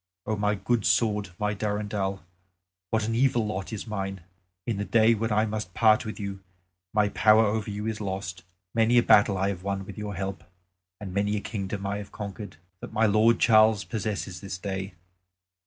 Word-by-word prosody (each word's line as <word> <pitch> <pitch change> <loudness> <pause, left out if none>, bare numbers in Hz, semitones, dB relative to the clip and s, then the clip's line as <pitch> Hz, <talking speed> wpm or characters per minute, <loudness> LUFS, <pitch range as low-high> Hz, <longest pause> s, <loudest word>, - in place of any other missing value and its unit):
O 110 - -1
my 105 0 +1
good 110 +3 0
sword, 105 +3 +2
my 105 0 0
Durendal, 105 -2 -2 0.7
what 110 -1 0
an 115 - -1
evil 120 -1 +2
lot 100 -1 -4
is 110 - -5
mine! 95 -4 -4 0.4
In 115 -4 -1
the 100 - -1
day 115 +2 +4
when 110 0 -2
I 105 +1 +3
must 105 -4 -5
part 110 -2 +4
with 110 -2 -6
you, 100 -1 -5 0.5
my 105 -1 +2
power 110 +2 +5
over 105 +1 -1
you 105 +1 -4
is 110 -1 -3
lost. 95 -3 -4 0.3
Many 115 +1 +3
a 120 - +6
battle 100 -1 +5
I 95 +1 +1
have 95 -3 -4
won 100 0 -3
with 100 +1 -9
your 105 -1 -4
help; 95 +1 -4 0.6
and 95 -3 -7
many 100 +2 0
a - - -1
kingdom 100 -1 -4
have 100 +1 -3
I - - -23
conquered, 100 -4 -7 0.2
that - - -8
my 110 0 +2
lord 110 +2 +4
Charles 110 -2 +5
possesses 100 -5 -4
this 95 -1 -5
day. 95 0 -5
105 Hz, 190 wpm, -27 LUFS, 100-110 Hz, 0.7 s, a